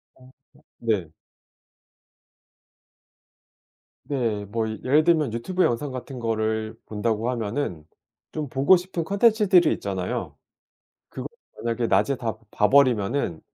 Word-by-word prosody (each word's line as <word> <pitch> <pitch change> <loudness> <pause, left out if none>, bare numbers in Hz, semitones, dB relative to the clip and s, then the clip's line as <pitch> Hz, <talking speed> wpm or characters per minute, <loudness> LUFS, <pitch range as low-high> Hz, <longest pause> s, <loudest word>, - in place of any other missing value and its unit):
어. 130 0 -18 0.5
네. 105 -8 -1 3.0
네. 115 -7 -1
뭐 110 +2 -2
예를 135 +7 +2
들면 155 -8 +3
유튜브 180 +11 -1
영상 130 +4 0
같은 130 0 -7
거를 110 -1 -1
본다고 110 +2 -1
하면은 110 - -3 0.5
좀 150 -4 -4
보고 135 +8 +5
싶은 180 -2 -3
콘텐츠들이 200 -2 +4
있잖아요. - - -4 0.7
그거를 - - -7 0.3
만약에 115 0 -1
낮에 105 +8 +3
다 115 -3 -4
봐 105 - +3
버리면은 125 - +3
120 Hz, 225 characters per minute, -24 LUFS, 110-145 Hz, 3.0 s, 보고